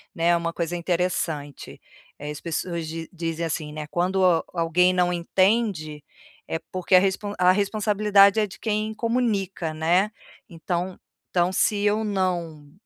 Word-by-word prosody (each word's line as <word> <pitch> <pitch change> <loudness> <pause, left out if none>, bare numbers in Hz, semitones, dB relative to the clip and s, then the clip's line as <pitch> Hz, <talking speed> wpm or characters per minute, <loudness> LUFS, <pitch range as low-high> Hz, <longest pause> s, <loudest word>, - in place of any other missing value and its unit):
né, 165 +1 0
é 175 - +4
uma 170 0 -3
coisa 170 0 -3
interessante, 170 -5 -3 0.4
eh, 145 - -6
as 150 - -7
pessoas 170 0 -3
di 165 0 -6
dizem 165 -1 -3
assim, 155 -2 -4
né: 155 -1 -6
"Quando 185 +4 0
a 170 -3 +3
alguém 180 +2 +2
não 180 -1 +2
entende, 175 -4 0 0.4
é 165 - -2
porque 185 0 -3
a 185 - +9
respon 195 +2 -1
a 180 0 +6
responsabilidade 205 0 +3
é 215 - +2
de 190 - -13
quem 215 0 -1
comunica, 210 -8 -1
né". 175 +7 +2 0.4
Então 175 +2 -4 0.3
então 175 0 +1
se 205 +2 +1
eu 210 +1 +2
não 175 -7 -2
180 Hz, 155 wpm, -24 LUFS, 165-200 Hz, 0.4 s, a